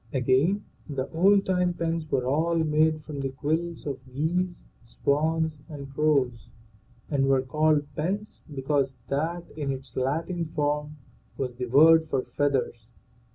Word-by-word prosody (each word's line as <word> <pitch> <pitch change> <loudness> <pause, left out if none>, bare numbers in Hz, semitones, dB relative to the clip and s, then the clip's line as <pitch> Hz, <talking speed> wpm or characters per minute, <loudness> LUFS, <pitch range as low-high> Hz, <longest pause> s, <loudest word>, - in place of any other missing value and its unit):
Again: 135 +10 +2 0.2
The 135 -2 -3
old 195 +4 +4
time 180 -1 +1
pens 165 -2 -2
were 125 - 0
all 160 +6 +1
made 155 -1 +2
from 150 -2 -7
the 135 -1 -1
quills 160 +5 -2
of 140 -3 -3
geese, 175 +6 -1 0.2
swans, 155 +5 0
and 140 -3 -8
crows, 140 -5 +1 0.6
and 135 -2 +2
were 135 -1 +3
called 150 +2 +2
pens 200 +7 -3
because 135 -1 0
that, 165 +5 -1
in 145 -3 -2
its 130 -2 -7
Latin 165 +6 -1
form, 150 -1 -2 0.4
was 130 -2 -2
the 125 +1 -4
word 160 +5 +6
for 130 -3 0
feathers. 130 -5 -1
150 Hz, 140 wpm, -27 LUFS, 135-165 Hz, 0.6 s, word